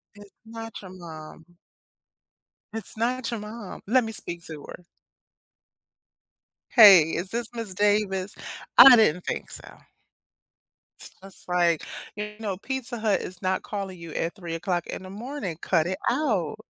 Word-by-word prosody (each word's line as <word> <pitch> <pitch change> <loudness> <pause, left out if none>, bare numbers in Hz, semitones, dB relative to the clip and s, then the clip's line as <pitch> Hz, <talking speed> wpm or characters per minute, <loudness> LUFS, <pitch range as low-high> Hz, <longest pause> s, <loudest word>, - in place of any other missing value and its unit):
It's 205 -1 -15
not 225 -1 -8
your 185 -2 -11
mom. 160 -3 -11 1.3
It's 225 -2 -5
not 245 +2 -1
your 230 - -3
mom. 210 -2 -8
Let 250 +4 +3
me 225 0 -5
speak 170 -4 -3
to 155 -3 -8
her. 180 - -10 1.9
"Hey, 205 -8 +10 0.2
is 185 +3 -3
this 235 -1 -3
Ms. 225 -6 -4
Davis?" 205 -2 +1 0.4
I 265 -2 +11
didn't 180 -6 +3
think - - -4
so. - - -10 1.2
It's - - -10
just 195 -1 -14
like, 175 -2 +2 0.3
"You 210 0 -6
know, 200 -4 -3
Pizza 255 0 -4
Hut 215 -2 +1
is 180 0 -8
not 185 0 -1
calling 195 -3 -5
you 165 -2 -9
at 165 +3 -2
3 170 -4 -6
o'clock 175 0 -2
in - - -6
the 185 - -9
morning, 210 - -6
cut 170 -2 +1
it 185 +1 -2
out." 230 - 0
195 Hz, 150 wpm, -26 LUFS, 180-225 Hz, 1.9 s, I